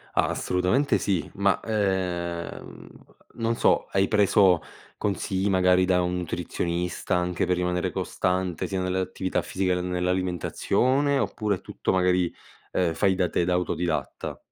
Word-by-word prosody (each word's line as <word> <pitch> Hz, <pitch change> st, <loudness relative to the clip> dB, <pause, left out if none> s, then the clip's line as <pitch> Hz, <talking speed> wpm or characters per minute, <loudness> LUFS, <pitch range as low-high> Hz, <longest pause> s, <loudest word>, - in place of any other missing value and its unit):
Assolutamente 90 Hz, +11 st, +1 dB
sì. 95 Hz, -5 st, -1 dB
Ma, 100 Hz, 0 st, +2 dB
ehm, 90 Hz, -5 st, -2 dB, 0.5 s
non 115 Hz, 0 st, 0 dB
so, -, -, +2 dB
hai 95 Hz, 0 st, +2 dB
preso 100 Hz, -4 st, +4 dB, 0.4 s
consigli 100 Hz, -1 st, -1 dB
magari 90 Hz, -1 st, +4 dB
da 90 Hz, -1 st, +3 dB
un 90 Hz, 0 st, -1 dB
nutrizionista, 90 Hz, +1 st, -2 dB
anche 90 Hz, -1 st, 0 dB
per 90 Hz, -, +1 dB
rimanere 90 Hz, 0 st, -1 dB
costante, 90 Hz, -2 st, -1 dB
sia 95 Hz, -1 st, -2 dB
nelle 90 Hz, 0 st, -1 dB
attività 95 Hz, 0 st, -2 dB
fisica 95 Hz, -1 st, -1 dB
che 90 Hz, -, -1 dB
nell'alimentazione, 90 Hz, -, 0 dB
oppure 105 Hz, -6 st, 0 dB
è -, -, -19 dB
tutto -, -, -3 dB
magari, 90 Hz, -1 st, +2 dB, 0.4 s
uhm, 90 Hz, -3 st, +1 dB
fai 95 Hz, +4 st, +2 dB
da 90 Hz, -2 st, +1 dB
te, 85 Hz, -, +1 dB
da 90 Hz, -, +1 dB
autodidatta? 90 Hz, -2 st, -2 dB
90 Hz, 135 wpm, -26 LUFS, 90-95 Hz, 0.5 s, preso